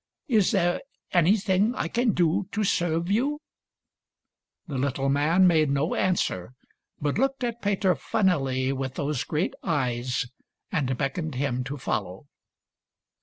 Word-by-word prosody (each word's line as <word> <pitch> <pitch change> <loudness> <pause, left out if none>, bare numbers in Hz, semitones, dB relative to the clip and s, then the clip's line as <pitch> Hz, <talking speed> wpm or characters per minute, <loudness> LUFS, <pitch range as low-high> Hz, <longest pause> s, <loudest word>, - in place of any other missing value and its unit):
Is 220 - +3
there 175 -3 +1 0.3
anything 190 +5 +3
I 165 - -1
can 235 +3 +1
do 175 +3 +1
to 215 - 0
serve 170 -1 0
you 275 +8 +1 0.4
} - - -63
" - - -57
The 140 -5 -3
little 135 0 0
man 155 +7 +4
made 160 -4 +4
no 140 +4 0
answer, 125 - 0 0.5
but 145 +6 -1
looked 270 0 0
at 235 -1 -2
Peter 195 -2 +2
funnily 135 -13 0
with 135 -1 -4
those 145 -2 -1
great 160 +4 -1
eyes, 125 -6 -1 0.5
and 135 -7 0
beckoned 150 +2 -2
him 130 -1 -1
to 140 +3 -5
follow. 100 -4 -3
160 Hz, 140 wpm, -26 LUFS, 135-190 Hz, 0.5 s, man